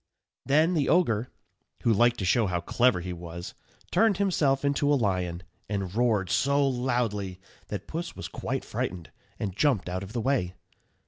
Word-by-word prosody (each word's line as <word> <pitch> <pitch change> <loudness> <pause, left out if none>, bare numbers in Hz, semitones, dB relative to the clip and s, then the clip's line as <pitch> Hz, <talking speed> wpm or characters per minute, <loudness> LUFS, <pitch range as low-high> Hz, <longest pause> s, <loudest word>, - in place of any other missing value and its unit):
Then 155 +5 +4
the 150 -5 +1
ogre, 125 -10 +2 0.5
who 115 - +4
liked 120 +3 +4
to 95 - -2
show 110 +3 +3
how 90 -1 0
clever 115 +2 +2
he 90 +1 -4
was, 85 0 -7 0.4
turned 220 -4 +3
himself 145 -9 +2
into 145 +1 +2
a - - +5
lion, 90 -6 -1 0.3
and 100 -3 -2
roared 110 -6 +1
so 140 +8 +3
loudly 120 -7 -1 0.3
that 105 -1 -5
Puss 170 +2 -5
was - - -6
quite - - -4
frightened, 85 -3 -4 0.3
and 95 -3 -3
jumped 110 -7 +2
out 90 +1 -3
of 100 +2 -8
the 120 - -1
way. 110 -9 0
115 Hz, 170 wpm, -27 LUFS, 95-140 Hz, 0.5 s, a